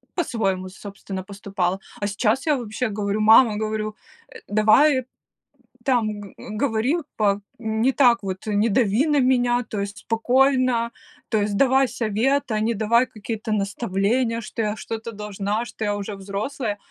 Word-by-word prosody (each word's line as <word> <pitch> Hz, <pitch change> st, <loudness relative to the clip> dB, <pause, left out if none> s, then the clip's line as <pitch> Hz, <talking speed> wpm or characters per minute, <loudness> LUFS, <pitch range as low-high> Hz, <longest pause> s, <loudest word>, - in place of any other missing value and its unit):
по-своему, 195 Hz, -, -1 dB
собственно, 195 Hz, 0 st, -8 dB
поступала. 195 Hz, -1 st, -3 dB, 0.2 s
А 205 Hz, -, 0 dB
сейчас 220 Hz, +7 st, 0 dB
я 300 Hz, -2 st, +3 dB
вообще 235 Hz, 0 st, -3 dB
говорю: 205 Hz, 0 st, -2 dB
"Мама, 220 Hz, 0 st, +6 dB
говорю, 215 Hz, 0 st, -2 dB, 0.4 s
э, -, -, -8 dB
давай, 240 Hz, +7 st, +4 dB, 0.8 s
там, 220 Hz, -5 st, +1 dB
г 200 Hz, -, -11 dB
говори 225 Hz, +4 st, -1 dB, 0.2 s
па 205 Hz, -1 st, +2 dB, 0.2 s
не 220 Hz, +2 st, +1 dB
так 240 Hz, -5 st, +4 dB
вот, 190 Hz, +1 st, -5 dB
не 210 Hz, +2 st, +2 dB
дави 225 Hz, +5 st, +2 dB
на 295 Hz, -1 st, +3 dB
меня, 245 Hz, -1 st, +2 dB
то 210 Hz, -, -3 dB
есть 200 Hz, 0 st, -4 dB
спокойно, 250 Hz, +1 st, +2 dB, 0.4 s
то 220 Hz, -, +1 dB
есть 205 Hz, 0 st, -1 dB
давай 265 Hz, +1 st, +4 dB
совет, 240 Hz, +5 st, 0 dB
а 215 Hz, -, +1 dB
не 225 Hz, +2 st, +1 dB
давай 230 Hz, +3 st, +3 dB
какие-то 220 Hz, -1 st, -6 dB
наставления, 215 Hz, +3 st, 0 dB
что 230 Hz, -, -5 dB
я 210 Hz, -1 st, -1 dB
что-то 225 Hz, +1 st, -6 dB
должна, 210 Hz, +1 st, -3 dB
что 220 Hz, -, -5 dB
я 205 Hz, 0 st, 0 dB
уже 205 Hz, 0 st, -5 dB
взрослая". 205 Hz, +4 st, -4 dB
220 Hz, 155 wpm, -23 LUFS, 205-245 Hz, 0.8 s, Мама